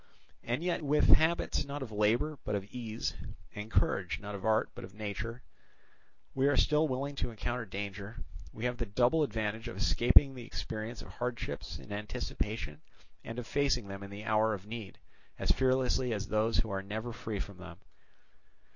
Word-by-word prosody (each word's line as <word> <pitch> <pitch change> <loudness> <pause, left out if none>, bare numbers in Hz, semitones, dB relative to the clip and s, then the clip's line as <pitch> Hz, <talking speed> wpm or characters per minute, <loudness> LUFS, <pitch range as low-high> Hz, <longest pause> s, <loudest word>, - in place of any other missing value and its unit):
And 120 +7 -1
yet 180 -1 +1
if 155 - -6
with 150 +1 +4
habits 160 -2 +5
not 140 0 -4
of 120 - -7
labour 115 +8 +2
but 105 - -1
of 100 - -1
ease, 115 0 -3 0.4
and 105 +1 -6
courage - - +2
not 105 +1 -6
of 100 -2 -6
art 110 +2 +3
but 120 - -8
of 95 - -10
nature, 110 +3 -4 0.9
we 135 +1 +3
are 145 - +4
still 150 +1 +4
willing 140 +1 -2
to - - 0
encounter 120 +1 -3
danger, 100 +2 -5 0.3
we 110 - -5
have 125 0 0
the 120 -2 -2
double 120 +9 +3
advantage 110 -3 -1
of 120 - -6
escaping 135 +3 +6
the 125 -2 -7
experience 110 0 -5
of - - -11
hardships 120 -12 -3
in - - -12
anticipation 105 -5 -3 0.4
and 115 - -6
of 125 - -3
facing 130 -6 +1
them 100 0 -6
in 100 - -7
the 100 +2 -7
hour 110 0 +3
of 95 0 -10
need 110 -3 -7 0.4
as - - +2
fearlessly 130 -1 +3
as 105 -1 -3
those 110 +2 +2
who 110 -2 +1
are 95 0 -1
never 110 +4 -4
free 110 -2 -4
from 100 -1 -5
them. 90 -1 -9
115 Hz, 185 wpm, -32 LUFS, 105-125 Hz, 0.9 s, escaping